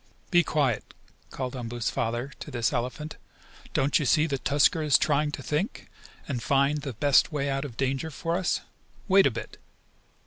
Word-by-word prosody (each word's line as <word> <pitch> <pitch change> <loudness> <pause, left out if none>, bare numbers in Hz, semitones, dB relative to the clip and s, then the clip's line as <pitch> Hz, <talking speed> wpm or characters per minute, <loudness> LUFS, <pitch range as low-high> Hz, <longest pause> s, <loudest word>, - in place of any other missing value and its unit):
"Be 175 -1 +5
quiet!" 135 -10 -1 0.3
called 130 -1 -4
Umboo's 120 -2 -3
father 120 +4 -2
to - - -7
this 115 -3 0
elephant. 130 +6 -3 0.6
"Don't 135 +2 +3
you 150 - -1
see 150 +5 +4
that 140 -4 -3
Tusker 145 +4 +3
is 150 -3 +5
trying 150 0 +1
to 135 - -5
think, 155 - -3 0.4
and 130 -5 -3
find 140 +4 +2
the 140 -3 -5
best 140 +8 +3
way 140 -2 -1
out 135 +1 -1
of 120 -5 -9
danger 135 +4 -1
for 165 +3 -2
us. 185 0 0 0.5
Wait 195 0 +6
a - - +3
bit." 115 - -8
140 Hz, 175 wpm, -27 LUFS, 125-150 Hz, 0.6 s, Wait